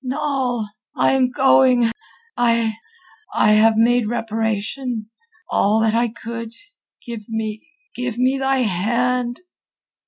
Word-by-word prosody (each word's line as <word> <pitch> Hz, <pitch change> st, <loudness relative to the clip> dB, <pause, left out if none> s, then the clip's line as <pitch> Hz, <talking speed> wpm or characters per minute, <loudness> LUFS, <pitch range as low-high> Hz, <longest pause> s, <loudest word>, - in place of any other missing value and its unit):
"Noll! 260 Hz, -4 st, -1 dB, 0.3 s
I -, -, +3 dB
am 265 Hz, -1 st, +2 dB
going! 255 Hz, -2 st, +4 dB, 0.4 s
I...I 235 Hz, -, -1 dB
have 220 Hz, +1 st, +5 dB
made 235 Hz, 0 st, +3 dB
reparation... 225 Hz, +1 st, -3 dB, 0.4 s
all 210 Hz, +2 st, +2 dB
that 220 Hz, -1 st, +2 dB
I 235 Hz, +1 st, +2 dB
could. 230 Hz, 0 st, -7 dB, 0.5 s
Give 230 Hz, -4 st, -8 dB
me... 220 Hz, +2 st, -4 dB, 0.3 s
give 250 Hz, -2 st, -4 dB
me 260 Hz, +2 st, +1 dB
thy 270 Hz, -1 st, +1 dB
hand!" 240 Hz, -, 0 dB
235 Hz, 105 wpm, -20 LUFS, 220-255 Hz, 0.5 s, have